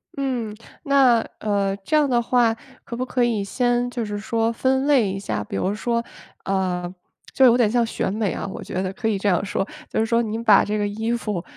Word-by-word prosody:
嗯， 250 -6 -2 0.3
那， 270 -5 +5 0.2
呃， 200 -2 0
这 200 +10 -2
样 295 -2 +3
的 240 -2 +2
话， 235 -1 +2 0.3
可 235 - -7
不 255 - -2
可 250 -1 0
以 225 -4 +1
先 245 +3 0
就 240 -1 -3
是 205 -1 -4
说 225 +2 0
分 265 +4 +1
类 245 -9 +3
一 195 - -4
下。 150 - -3
比 100 - -7
如 190 - -1
说， 235 +2 -1 0.4
呃， 180 -2 -1 0.4
就 265 - +5
有 240 -2 +7
点 235 -4 +3
像 235 +1 +2
选 225 - -2
美 210 -1 -1
啊， - - -4
我 190 - -7
觉 185 - -3
得 185 - -2
可 225 - -3
以 215 -2 +1
这 205 - -1
样 180 0 +2
说。 195 0 -2 0.2
就 - - -1
是 220 - +2
说 230 +1 +2
您 225 +1 -4
把 210 -3 +6
这 210 +1 -1
个 205 - 0
衣 220 +3 -2
服， 210 -7 -3
225 Hz, 245 characters per minute, -22 LUFS, 200-245 Hz, 0.4 s, 有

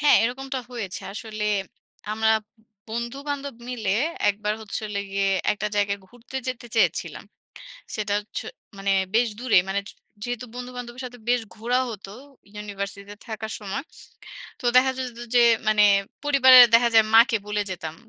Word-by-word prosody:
হ্যাঁ। 295 0 +6
এরকমটা 265 +2 -3
হয়েছে। 220 -7 -5
আসলে 215 0 -5 0.7
আমরা 220 0 +2 0.6
বন্ধু-বান্ধব 275 +4 -4
মিলে 225 -6 -2 0.4
একবার 210 +1 -2
হচ্ছে 215 0 -5
হলো 200 -1 -3
গিয়ে 195 0 0 0.3
একটা 210 0 -3
জায়গায় 200 0 +1
ঘুরতে 245 +2 -10
যেতে 245 -1 -5
চেয়েছিলাম। 225 - +1 0.7
সেটা 210 -2 -2
হচ্ছে 210 - -7 0.3
মানে 195 0 -1 0.2
বেশ 235 0 +4
দূরে 245 -4 +2
মানে 200 +1 0
য - - -8 0.3
যেহেতু 245 0 -4
বন্ধু-বান্ধবের 250 0 -7
সাথে 245 0 -11
বেশ 245 0 +3 0.2
ঘোরা 240 +3 0
হতো, 195 -2 -8 0.4
ইউনিভার্সিটিতে 200 0 -6
থাকার 220 -1 -5
সময়। 210 +8 -4 0.8
তো - - -8
দেখা 260 +1 +6
যেত 250 -2 -5 0.2
যে - - +7 0.3
মানে 210 -1 +5 0.4
পরিবারের 260 -3 +9
দেখা 235 0 +6
যায় 220 -1 +7
মাকে 230 0 +6
বলে 210 0 0
যেতাম। 160 -3 -6
230 Hz, 145 wpm, -24 LUFS, 210-250 Hz, 0.8 s, পরিবারের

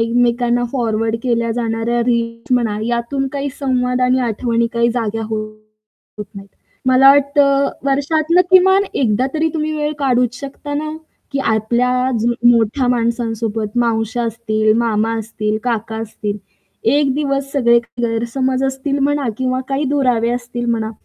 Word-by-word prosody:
एकमेकांना 240 +1 +1
फॉरवर्ड 225 -3 0
केल्या 235 -2 0
जाणाऱ्या 230 0 -1
रील्स 230 0 -1
म्हणा 220 -4 0
यातून 240 +3 -1
काही 280 0 -2
संवाद 250 -2 0
आणि 255 +1 +3
आठवणी 235 0 0
काही 235 0 +2
जाग्या 225 -2 -2
होत 215 -1 -9
नाहीत. 195 0 -10 0.4
मला 260 +1 +6
वाटतं 280 0 +3 0.2
वर्षातनं 310 +5 +2
किमान 380 +1 +6
एकदा 250 0 +1
तरी 320 +1 +1
तुम्ही 310 0 -1
वेळ 300 0 -1
काढूच 250 -2 +1
शकता 285 +1 -7
ना, 305 +1 -2 0.4
की 275 - -1
आपल्या 250 +2 +1
जु 240 +1 +1 0.2
मोठ्या 235 +2 +2
माणसांसोबत, 230 -2 -1
मावश्या 230 0 0
असतील, 215 -1 0
मामा 225 -1 +1
असतील, 215 -1 -3
काका 225 -2 -2
असतील, 215 -2 -4 0.5
एक 275 +3 +3
दिवस 275 -1 -1
सगळे 235 -4 +4 0.2
गैरसमज 240 +3 -1
असतील 270 +1 -2
म्हणा 280 -2 0
किंवा 255 0 0
काही 275 +2 -1
दुरावे 250 -5 +1
असतील 240 0 -4
म्हणा, 220 -1 -1
240 Hz, 135 wpm, -17 LUFS, 225-270 Hz, 0.5 s, मला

